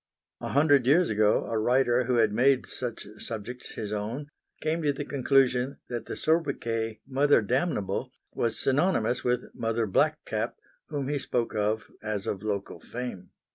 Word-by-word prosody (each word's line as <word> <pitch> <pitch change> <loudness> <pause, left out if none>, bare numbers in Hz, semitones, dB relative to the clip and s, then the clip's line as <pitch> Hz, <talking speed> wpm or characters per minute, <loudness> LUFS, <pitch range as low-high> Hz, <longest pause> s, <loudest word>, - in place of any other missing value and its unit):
A - - -4
hundred 145 -3 +4
years 165 +6 +5
ago 105 0 +3
a 115 - -1
writer 125 +1 +3
who 125 0 +1
had 110 -3 +3
made 130 +3 +4
such 120 -3 -5
subjects 115 +3 -6
his 105 -1 -4
own, 115 +8 -4 0.3
came 160 +2 -1
to 150 -2 +2
the 140 +1 -5
conclusion 135 -1 +2
that 120 -1 -4
the - - -4
soubriquet 120 -9 0
Mother 140 -3 +3
Damnable 125 - -1 0.2
was 115 -1 0
synonymous 135 - +1
with 125 0 -1
Mother 115 0 0
Black 95 - +2
Cap - - -2 0.3
whom 145 -3 -3
he 145 0 0
spoke 120 -3 -1
of 105 +1 -1
as 105 -2 -3
of 95 - -2
local 100 -4 -3
fame. 115 -4 -6
125 Hz, 160 wpm, -28 LUFS, 110-140 Hz, 0.3 s, years